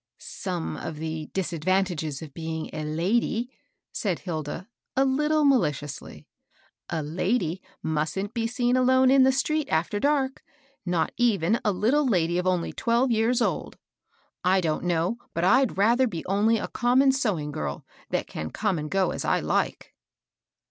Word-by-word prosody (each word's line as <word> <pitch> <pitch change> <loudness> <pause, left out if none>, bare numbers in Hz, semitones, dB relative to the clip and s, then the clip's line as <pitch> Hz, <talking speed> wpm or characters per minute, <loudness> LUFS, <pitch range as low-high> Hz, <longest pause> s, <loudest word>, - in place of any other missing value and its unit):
" - - -66
Some 80 -1 -5
of 155 - -5
the 155 0 -4
disadvantages 175 -4 -1
of 150 -3 -10
being 160 -1 -4
a 155 - -4
lady^^ 205 +10 0 0.4
said 190 -6 -1
Hilda, 165 +1 -5 0.3
a 270 - +4
Uttle 300 +3 +2
maKdously. 150 - 0 0.6
A 160 -2 -2
lady 180 +3 -1 0.2
mustn't 160 +7 -2
be 230 -1 -1
seen 245 +1 +1
alone 260 0 +4
in 270 0 +6
the 260 0 +6
street 305 +3 0
after 170 +6 0
dark, 275 0 +1 0.2
— 275 0 -34
not 175 -2 +1
even 225 -3 +2
a 210 - +2
little 255 +10 +2
lady 175 -5 +2
of 180 - -1
only 180 -2 0
twelve 240 +2 +1
years 230 +2 +2
old. - - -2 0.7
I 185 +1 +4
don't 165 -1 -1
know 175 +5 0 0.2
but 170 - 0
I'd 245 +3 +3
rather 235 +6 +4
be 170 -8 -5
only 210 +4 +2
a - - -3
common 255 +3 +3
sewing 200 - -1
girl, 75 - -4 0.2
that - - -1
can 80 0 -6
come 200 - -1
and 150 0 -5
go 190 0 +1
as - - -4
I - - +2
like." - - -1
195 Hz, 160 wpm, -26 LUFS, 160-245 Hz, 0.7 s, in